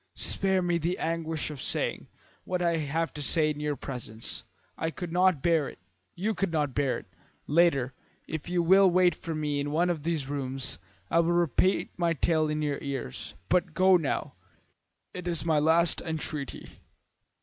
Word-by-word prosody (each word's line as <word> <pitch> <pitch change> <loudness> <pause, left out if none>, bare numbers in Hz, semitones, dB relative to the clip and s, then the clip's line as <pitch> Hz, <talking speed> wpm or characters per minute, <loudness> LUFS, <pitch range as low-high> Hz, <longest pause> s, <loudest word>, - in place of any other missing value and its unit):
"Spare 190 -1 +1
me 175 -1 +1
the 170 +3 -1
anguish 160 -1 -2
of 145 - -7
saying - - -2 0.4
what 180 0 -2
I 170 -1 +1
have 160 +2 -1
to 150 - -6
say 155 +2 +3
in 150 - -6
your 150 -1 -1
presence. 120 -5 -7 0.3
I 160 - -2
could 170 +1 -6
not 180 -4 +3
bear 165 -4 +2
it. - - -13 0.4
You 210 +5 -1
could 195 -2 -1
not 150 -4 0
bear 140 -2 +1
it. - - -10 0.4
Later, 145 -5 +3 0.3
if 160 +1 -5
you 175 -1 +1
will 190 +3 +6
wait 180 -1 +4
for 165 -2 -5
me 150 -2 -1
in 145 +1 -2
one 170 +4 +2
of 160 -4 -3
these 155 -3 -2
rooms, 135 - -3 0.3
I 170 - +4
will 170 +1 +3
repeat 175 +2 +2
my 170 -2 +2
tale 155 -1 +1
in 150 0 -1
your 145 -2 -1
ears, 135 - -5
but 180 - +1
go 185 0 +6
now. 150 -4 -1 0.8
It 180 -1 -6
is 170 -2 -1
my 160 -2 +3
last 165 +3 +4
entreaty." 155 -3 -5
160 Hz, 180 wpm, -28 LUFS, 145-175 Hz, 0.8 s, will